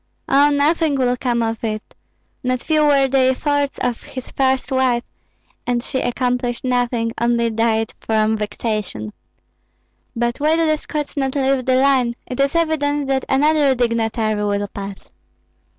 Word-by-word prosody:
"Oh, 285 +2 +5
nothing 295 +1 +2
will 250 -2 +1
come 240 -2 0
of 225 0 -3
it! 215 -1 -4 0.5
Not 255 0 0
few 310 -1 +2
were 280 -2 +4
the 270 +1 +2
efforts 280 +2 +1
of 240 -2 -1
his 255 -1 -8
first 265 -1 0
wife, 255 -2 +2 0.6
and 240 -1 0
she 260 - -2
accomplished 245 0 -1
nothing, 245 -2 0
only 235 -1 +2
died 225 0 0
from 220 0 +1
vexation. 210 - -3 1.0
But 240 +2 -1
why 305 +2 +3
do 330 0 +2
the 310 -1 +2
Scots 300 -1 -5
not 270 -1 -1
leave 270 -2 +1
the 255 - +4
line? 260 -3 +3
It 250 - -6
is 275 +3 +1
evident 290 -4 0
that 265 -1 0
another 290 0 +3
dignitary 225 -3 0
will 205 0 -1
pass." 200 -1 -8
255 Hz, 150 wpm, -20 LUFS, 230-275 Hz, 1.0 s, Oh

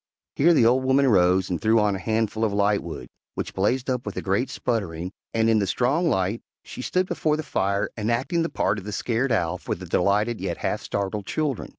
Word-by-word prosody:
Here 170 +4 +4
the 120 - +5
old 125 +3 +4
woman 135 +1 +3
rose 90 -3 +3
and 85 - -2
threw 110 +1 +4
on 105 -2 +2
a - - -4
handful 110 +1 -1
of 110 - +2
lightwood, 100 -8 0 0.3
which - - -4
blazed 120 +7 0
up 125 -2 -1
with - - -6
a - - -1
great 100 +7 0
sputtering, 90 -7 -3 0.2
and 115 0 +1
in 110 -1 +4
the 100 - 0
strong 140 - +1
light 100 -1 0 0.2
she - - -8
stood 185 +8 0
before 155 -4 0
the 155 - -3
fire 100 -7 0
enacting 120 - 0
the 165 - -1
part 100 - 0
of - - -11
the 105 +1 -6
scared 125 +5 -1
Owl 90 -5 0
for - - -3
the 95 - -9
delighted 105 +6 +1
yet - - -3
half - - -2
startled 100 0 -3
children. 150 -6 -2
110 Hz, 220 wpm, -24 LUFS, 100-130 Hz, 0.3 s, the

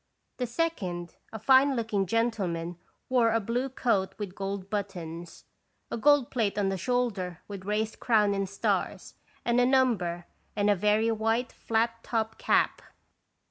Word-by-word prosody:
'' - - -49
The 250 - -1
second, 200 - -2 0.2
a 220 - -5
fine 265 +5 +5
looking 220 -5 0
gentleman, 180 -6 -1 0.3
wore 245 -3 +3
a 225 - +2
blue 240 +5 -1
coat 230 -7 0
with 205 -4 -5
gold 195 -1 -4
buttons, 175 -5 -5 0.5
a - - -1
gold 290 +1 +4
plate 220 -6 0
on 200 -2 +1
the 195 - -1
shoulder 205 -7 -1
with 195 -2 -8
raised 215 +1 -1
crown 210 -4 +3
and 195 -1 -1
stars 195 - -2 0.3
and 240 +1 +3
a - - +4
number, 210 -10 +2 0.3
and 205 0 +3
a - - +4
very 210 +4 +2
white 225 +2 0
flat 230 0 -1
topped 225 -1 -2
cap. - - +2
215 Hz, 155 wpm, -28 LUFS, 195-235 Hz, 0.5 s, fine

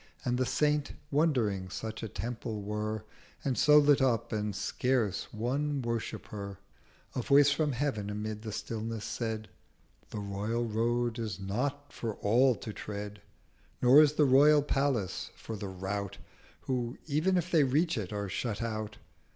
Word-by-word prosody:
And 125 0 +1
the 130 - +1
Saint 150 -1 +1 0.2
wondering 120 - +1
such 110 +4 -5
a 110 - -4
Temple 115 -2 -4
were, 105 +1 -3 0.4
And 135 -2 +1
so 150 +3 +6
lit 145 -1 +5
up, 115 -3 +1
and 105 -2 -1
scarce 120 -5 0
one 140 +6 -1
worshipper, 105 -4 -4 0.6
100 - - -2
A - - +1
voice 140 +3 +5
from 150 0 +1
Heav'n 120 -6 -1
amid 105 +1 -4
the 110 -1 -5
stillness 110 0 -4
said: 110 -1 -3 0.6
'The - - -6
Royal 105 +4 -2
Road 120 +1 0
is 110 -6 -3
not 135 +9 -3
for 115 -3 -4
all 125 +5 +3
to 110 +1 -7
tread, 105 0 -6 0.6
Nor 130 +5 +8
is 150 -1 +4
the 150 -1 +4
Royal 145 +2 +6
Palace 135 -9 0
for 110 - -7
the 100 -1 -5
Rout, 95 +1 -4 0.4
Who, 125 -1 -2
even 160 +5 +2
if 175 +1 -1
they 160 -4 +5
reach 150 +6 +2
it, 105 -4 -3
are 100 -1 -3
shut 105 +3 -3
out. 110 -2 -3
115 Hz, 160 wpm, -31 LUFS, 105-140 Hz, 0.6 s, Nor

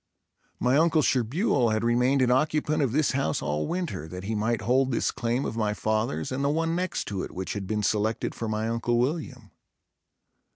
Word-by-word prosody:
My 125 +3 +3
uncle 160 -1 +3
Sherbuel 130 - +2
had 110 +1 0
remained 125 +3 +3
an 125 - +2
occupant 150 +3 +1
of 135 -5 +1
this 150 +3 +2
house 135 +1 0
all 75 +1 -2
winter, 150 - -3
that 90 +2 -7
he 105 +3 -3
might 110 +2 0
hold 130 +2 +2
this 120 - 0
claim 120 +3 -1
of - - -3
my 105 -2 0
father's 110 -8 -1
and 135 +2 -2
the 140 - +2
one 165 +2 0
next 185 +1 -2
to 100 -3 -3
it, - - -5
which 95 +1 -5
had 100 -2 -5
been 105 +1 -1
selected 110 +2 0
for 115 - -4
my 110 +1 -1
Uncle 115 +1 0
William. 125 -4 -2
120 Hz, 200 wpm, -27 LUFS, 110-140 Hz, -, My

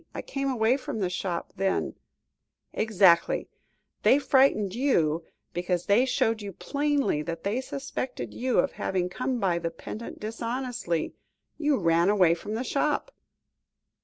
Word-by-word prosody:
I - - -4
came 275 0 -2
away 245 0 +2
from 255 -4 -5
the 185 -4 -1
shop, 180 -1 -3
then 195 0 0 0.4
" - - -53
"Exactly; 190 -5 +4 0.5
they 270 - +6
frightened 260 -9 +3
you, 170 - +1 0.3
because 175 0 -1
they 215 +6 +4
showed 225 -3 +1
you 200 -1 -6
plainly 285 - 0
that 165 +1 -5
they 215 +6 0
suspected 265 -1 -5
you 255 0 0
of - - +3
having 180 -1 -1
come 255 +5 -2
by 180 -5 +1
the 165 - -2
pendant 210 +7 -8
dishonestly. 230 -5 -3 0.5
You 295 -3 +2
ran 170 0 +3
away 185 -5 +5
from 205 +5 -5
the 235 - -2
shop." 295 - 0
215 Hz, 145 wpm, -27 LUFS, 180-260 Hz, 0.5 s, they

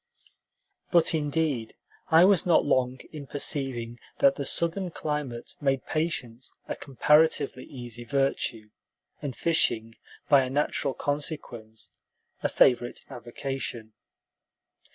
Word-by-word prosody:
But 170 -1 +3
indeed 150 -6 -1 0.3
I 165 +2 +7
was 195 -3 +4
not 175 -2 +4
long 130 -2 +1
in 145 -3 -8
perceiving 130 -5 -2 0.2
that 140 - +5
the 140 - -5
Southern 170 +5 0
climate 150 -7 -4
made 135 -2 0
patience 135 -7 -3 0.2
a - - -3
comparatively 145 -1 +2
easy 120 -3 -7
virtue, 120 -4 -1 0.5
and 140 -4 -4
fishing, 115 -9 +1 0.3
by 140 -2 +6
a 130 - -2
natural 140 -1 0
consequence, 130 -7 -4 0.5
a - - 0
favorite 120 -1 +3
avocation. 120 -2 -5
135 Hz, 110 wpm, -27 LUFS, 120-150 Hz, 0.5 s, I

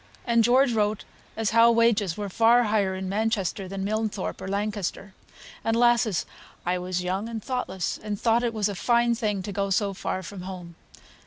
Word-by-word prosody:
And 235 -1 +3
George 250 +2 +4
wrote 210 -1 0 0.3
as 220 -2 0
how 230 +1 +6
wages 230 -6 +2
were 205 -1 -3
far 230 +5 +4
higher 205 -4 +1
in 190 0 -4
Manchester 200 -2 -1
than 195 +1 -5
Milnthorpe 215 -1 -2
or - - -6
Lancaster; 200 -1 -3 0.5
and, 225 - +1
lasses, 240 -5 +3 0.4
I 180 +1 0
was 180 0 -3
young 190 +5 -2
and 225 -2 -5
thoughtless, 220 -9 -3
and 210 -1 -4
thought 230 0 +3
it 240 -1 0
was 215 -2 0
a 205 - -3
fine 235 +4 +2
thing 210 -4 -1
to 205 - -5
go 200 0 -1
so 200 +1 +1
far 185 0 -4
from 190 +1 -8
home. 180 -2 -8
210 Hz, 185 wpm, -26 LUFS, 190-230 Hz, 0.5 s, how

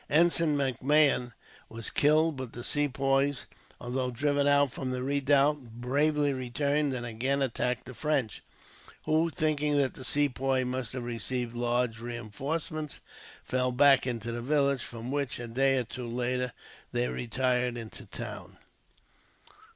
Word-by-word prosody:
Ensign 165 -1 +4
MacMahon 135 -1 +2 0.4
was 115 0 -2
killed, 155 +2 +3
but 130 -3 -6
the 120 - -7
Sepoys, 135 -1 +1 0.3
although 125 +1 -2
driven 145 +3 +1
out 145 -2 +4
from 130 0 -4
the 125 0 -2
redoubt, 140 -3 +2
bravely 145 +3 +1
returned 140 +3 0
and 120 -1 -4
again 130 +5 0
attacked 125 -1 -1
the 130 - -9
French; 135 -5 -1 0.6
who, 160 +2 +2
thinking 150 -2 0
that 140 -2 +2
the 130 - -10
Sepoys 135 -1 +1
must 125 -2 -3
have 125 -2 -4
received 120 0 -2
large 120 -1 0
reinforcements, 135 +7 -4 0.4
fell 125 0 0
back 135 0 +5
into 120 -1 -3
the 120 0 -4
village; 140 0 +2
from 120 +2 -6
which, 140 -2 -1
a 120 - -6
day 135 +3 +2
or 125 - +1
two 120 +1 -7
later, 125 +1 -1 0.4
they - - 0
retired 125 - 0
into 115 -2 -9
the - - -11
town. - - -7
130 Hz, 145 wpm, -29 LUFS, 120-145 Hz, 0.6 s, back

